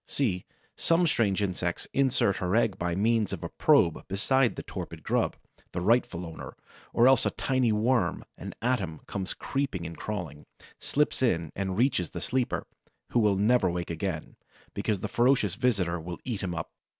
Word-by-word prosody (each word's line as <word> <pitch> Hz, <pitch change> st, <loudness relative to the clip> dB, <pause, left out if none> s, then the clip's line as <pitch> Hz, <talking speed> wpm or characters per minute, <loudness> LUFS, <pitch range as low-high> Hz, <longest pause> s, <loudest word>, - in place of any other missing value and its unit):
See, 100 Hz, -10 st, -1 dB, 0.3 s
some 170 Hz, +1 st, +3 dB
strange 105 Hz, -, +2 dB
insect 90 Hz, -3 st, -2 dB
inserts 130 Hz, -8 st, +2 dB
her 90 Hz, 0 st, 0 dB
egg 110 Hz, -4 st, +2 dB
by 85 Hz, -1 st, -1 dB
means 110 Hz, +1 st, +2 dB
of -, -, -5 dB
a -, -, -3 dB
probe 85 Hz, -, +3 dB
beside 120 Hz, +6 st, +2 dB
the -, -, -6 dB
torpid -, -, -7 dB
grub, -, -, +1 dB, 0.4 s
the -, -, -2 dB
rightful 90 Hz, -3 st, +2 dB
owner; 80 Hz, -1 st, -8 dB, 0.4 s
or 120 Hz, -, +5 dB
else 135 Hz, 0 st, +5 dB
a -, -, +2 dB
tiny 130 Hz, -3 st, +1 dB
worm, 110 Hz, -3 st, +1 dB
an -, -, -8 dB
atom, 120 Hz, -11 st, -1 dB
comes 95 Hz, -2 st, -4 dB
creeping 135 Hz, -11 st, -2 dB
and 85 Hz, +1 st, -6 dB
crawling, 80 Hz, -6 st, -5 dB, 0.3 s
slips 150 Hz, -1 st, 0 dB
in 85 Hz, -, +1 dB
and 95 Hz, -1 st, -2 dB
reaches 120 Hz, -, +2 dB
the -, -, -6 dB
sleeper, 130 Hz, -2 st, -1 dB, 0.5 s
who 120 Hz, -, +3 dB
will 105 Hz, -3 st, +4 dB
never 105 Hz, 0 st, +3 dB
wake 85 Hz, 0 st, -3 dB
again, 80 Hz, -1 st, -4 dB, 0.4 s
because 105 Hz, -4 st, -1 dB
the 105 Hz, -, -2 dB
ferocious 120 Hz, -4 st, +3 dB
visitor 100 Hz, -9 st, +1 dB
will 85 Hz, +1 st, -6 dB
eat 115 Hz, -6 st, -3 dB
him 90 Hz, -3 st, -3 dB
up. 80 Hz, -, -5 dB
100 Hz, 175 wpm, -28 LUFS, 90-125 Hz, 0.5 s, or